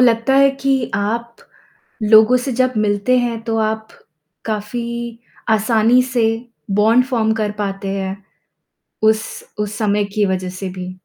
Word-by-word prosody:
लगता 235 +1 +3
है 275 0 +6
कि 275 - +2 0.2
आप, 230 +4 -2 0.7
लोगों 220 +3 +6
से 255 +2 -3
जब 255 +1 +1
मिलते 205 +5 +2
हैं 235 -2 -1
तो 225 -1 -1
आप, 220 0 -1 0.6
काफ़ी 235 +2 -4 0.3
आसानी 220 +2 +3
से 235 -3 +3 0.5
बॉन्ड 230 +4 +4
फ़ॉर्म 225 -4 +1
कर 210 -1 0
पाते 195 -1 -3
हैं, 190 0 -3 0.9
उस 220 0 +3 0.3
उस 210 0 -2
समय 210 -2 +1
की 210 -1 +3
वज़ह 185 -1 -2
से 195 - -3
भी? 180 0 -5
220 Hz, 140 wpm, -18 LUFS, 210-235 Hz, 0.9 s, है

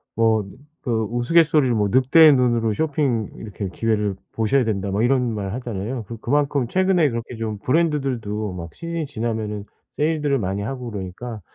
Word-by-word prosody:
뭐 110 -1 +3
느 95 +3 -13 0.2
그 115 -3 0
우스갯소리로 140 +1 +3
뭐 105 -2 +1
"늑대의 140 +6 +6
눈으로 120 -4 +2
쇼핑 140 -6 0
이렇게 105 -2 -6
기회를 105 0 -1 0.2
보셔야 115 +4 +2
된다." 100 -3 -1
뭐 100 +2 0
이런 125 -2 +2
말 100 -2 -3
하잖아요. 120 0 -4
그리고 115 -1 -8
그만큼 140 -2 +1
최근에 185 -3 +3
그렇게 115 0 -5
좀 110 -2 -4
브랜드들도 125 - 0
막 85 -2 -7
시즌이 170 -1 -4
지나면은 110 -5 -3 0.3
세일들을 150 -3 +1
많이 95 0 -2
하고 125 +2 -4
그러니까 105 +3 -6
115 Hz, 390 characters per minute, -22 LUFS, 105-140 Hz, 0.3 s, 늑대의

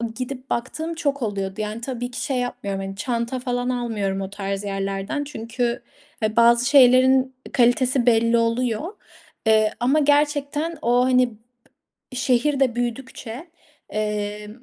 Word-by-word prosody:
gidip 255 +2 -6
baktığım 315 +7 -3
çok 285 -4 -1
oluyordu. 200 -2 -3
Yani, 215 +2 -4
tabii 245 0 -4
ki - - -5
şey 265 -2 -1
yapmıyorum. 200 -5 -3
Hani, 195 0 -6
çanta 235 +2 -2
falan 245 0 -2
almıyorum 215 -6 -2
o 190 - -4
tarz 195 0 -4
yerlerden 195 +7 -3
çünkü, 235 -3 -3 0.4
he, 215 0 0
bazı 235 +1 +5
şeylerin 260 -1 +5 0.2
kalitesi 250 0 +3
belli 230 0 +4
oluyor. 230 - 0 0.5
Eee, 215 -1 +4
ama 270 +6 +3
gerçekten 295 +2 +1
o, 245 +1 +3
hani, 255 -1 +3
b 235 +3 -23 0.6
şehir 255 +3 +1
de 255 -3 +2
büyüdükçe, 245 +3 -5 0.4
eee, 210 0 -3
245 Hz, 135 wpm, -23 LUFS, 215-260 Hz, 0.6 s, bazı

